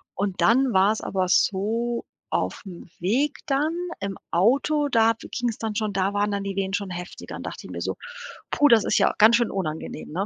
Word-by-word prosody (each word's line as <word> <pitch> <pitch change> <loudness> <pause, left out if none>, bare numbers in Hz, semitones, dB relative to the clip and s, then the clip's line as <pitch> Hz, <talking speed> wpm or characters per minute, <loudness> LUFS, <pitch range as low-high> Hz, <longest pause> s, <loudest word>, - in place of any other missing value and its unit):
Und 195 -1 -2
dann 255 +2 +4
war's 200 +3 +3
aber 185 -1 -1
so: 225 +5 +1 0.3
Auf'm 180 -3 -4
Weg 245 - 0
dann 295 +4 +1 0.3
im 200 -1 -4
Auto, 280 - +2
da 230 -2 +4
be 225 - -12
ging's 240 -3 -2
dann 220 -2 -4
schon 210 -1 -1
da 195 +1 0
waren 205 0 +1
dann 200 -1 -2
die 195 -1 -4
Wehen 195 -1 -2
schon 200 -1 -2
heftiger. 180 0 -7
Dann - - -7
dacht - - -7
ich - - -11
mir - - -6
so: - - -2 0.6
„Puh, 290 - +4
das 230 -5 +6
ist - - +1
ja - - +3
ganz 220 +2 +7
schön 240 -2 0
unangenehm, 160 -5 -5
ne?“ 185 +5 -1
205 Hz, 205 wpm, -24 LUFS, 190-235 Hz, 0.6 s, ganz